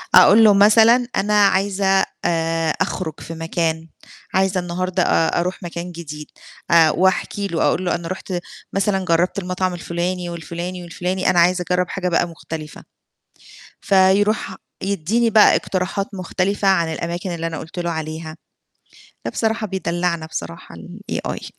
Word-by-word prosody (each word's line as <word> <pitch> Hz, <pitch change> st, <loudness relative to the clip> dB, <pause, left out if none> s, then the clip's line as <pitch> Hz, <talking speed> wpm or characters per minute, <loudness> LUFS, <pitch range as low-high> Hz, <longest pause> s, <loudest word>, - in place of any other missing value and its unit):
أقول 200 Hz, +4 st, +8 dB
له 210 Hz, -2 st, +7 dB
مثلًا 225 Hz, +4 st, +5 dB
"أنا 210 Hz, 0 st, +3 dB
عايزة 195 Hz, 0 st, +2 dB, 0.2 s
آآ 165 Hz, -1 st, 0 dB
أخرُج 160 Hz, -5 st, -2 dB
في 165 Hz, -, -8 dB
مكان، 165 Hz, 0 st, -2 dB, 0.5 s
عايزة 190 Hz, 0 st, +2 dB
النهاردة 180 Hz, +1 st, -1 dB
أ 165 Hz, 0 st, +2 dB
أروح 180 Hz, +2 st, -3 dB
مكان 175 Hz, +1 st, -6 dB
جديد." 150 Hz, -3 st, -8 dB, 0.4 s
آآ 165 Hz, -2 st, +6 dB
وأحكي 190 Hz, +3 st, 0 dB
له 170 Hz, -4 st, -1 dB
أقول 185 Hz, -, +1 dB
له: 175 Hz, -, +1 dB
"أنا 170 Hz, -1 st, -5 dB
رُحت 185 Hz, +1 st, -6 dB, 0.4 s
مثلًا 195 Hz, -1 st, 0 dB
جرّبت 175 Hz, +3 st, +1 dB
المطعم،" 185 Hz, 0 st, -2 dB
الفُلاني 175 Hz, +1 st, -3 dB
والفُلاني 170 Hz, +2 st, -6 dB
والفُلاني، 180 Hz, +2 st, -2 dB
"أنا 175 Hz, -, +3 dB
عايزة 180 Hz, +1 st, +3 dB
أجرّب 180 Hz, 0 st, +1 dB
حاجة 180 Hz, -2 st, -2 dB
بقى 170 Hz, 0 st, +1 dB
مختلفة." 160 Hz, -2 st, -8 dB, 1.0 s
فيروح 195 Hz, +1 st, +2 dB, 0.3 s
يدّيني 200 Hz, +5 st, 0 dB
بقى 220 Hz, -1 st, +6 dB
اقتراحات 190 Hz, +1 st, -2 dB
مختلفة 195 Hz, +2 st, -1 dB
عن 170 Hz, -4 st, +2 dB
الأماكن 170 Hz, +3 st, -4 dB
اللي 165 Hz, -1 st, -3 dB
أنا 165 Hz, -1 st, -4 dB
قُلت 165 Hz, +3 st, -9 dB
له 175 Hz, -1 st, -2 dB
عليها، 160 Hz, 0 st, -5 dB, 0.9 s
لأ -, -, -1 dB
بصراحة 225 Hz, -1 st, -1 dB
بيدلّعنا 175 Hz, -3 st, -2 dB
بصراحة 85 Hz, -, -7 dB, 0.4 s
الAi -, -, -4 dB
180 Hz, 140 wpm, -20 LUFS, 170-195 Hz, 1.0 s, أقول